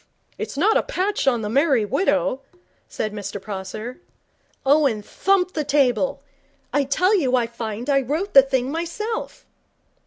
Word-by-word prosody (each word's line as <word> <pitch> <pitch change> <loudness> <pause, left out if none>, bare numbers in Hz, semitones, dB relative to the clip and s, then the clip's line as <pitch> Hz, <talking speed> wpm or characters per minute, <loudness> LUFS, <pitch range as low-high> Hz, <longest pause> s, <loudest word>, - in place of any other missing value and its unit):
'It's - - -5
not 415 +9 +4
a - - +3
patch 405 - -2
on 240 -4 +2
The - - -2
Merry 265 -1 +2
Widow,' 275 - 0 0.5
said 215 - -4
Mr 200 -1 -5
Prosser. 210 - -6 0.7
Owen 270 -7 +3
thumped 370 - +1
the 305 - -1
table. 275 -1 +1 0.5
'I 285 0 +2
tell 365 +9 +2
you 265 -9 +2
I 245 -2 +2
find 230 0 -6
I 275 -1 +3
wrote 310 - -3
the 275 - +10
thing 265 -1 -1
myself.' 425 +9 -4
275 Hz, 150 wpm, -22 LUFS, 235-335 Hz, 0.7 s, the